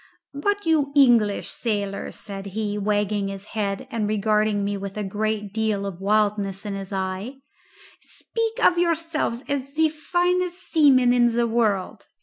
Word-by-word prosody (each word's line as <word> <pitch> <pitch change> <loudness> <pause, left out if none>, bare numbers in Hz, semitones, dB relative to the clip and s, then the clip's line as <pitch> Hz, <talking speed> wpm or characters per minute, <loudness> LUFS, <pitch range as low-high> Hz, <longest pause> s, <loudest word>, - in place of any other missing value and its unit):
"But 410 +8 -1
you 305 -4 +2
English 235 -7 +4
sailors," 205 -4 -3
said 195 -1 -7
he, 210 -2 -1
wagging 205 0 0
his 195 +1 -7
head 200 -3 -2
and 220 -3 -1
regarding 210 0 +1
me 200 0 -1
with 195 0 -6
a 210 - -2
great 210 0 -2
deal 215 -2 0
of 190 -2 -6
wildness 205 -1 0
in 205 - -3
his 195 0 -6
eye, 190 +6 -3 0.7
"speak 455 +1 -2
of 345 - +4
yourselves 330 -7 0
as 275 0 -3
the 320 0 +3
finest 355 +3 0
seamen 265 -8 +4
in 240 -1 +4
the 235 0 +2
world. 220 -5 0
215 Hz, 150 wpm, -24 LUFS, 200-280 Hz, 0.7 s, English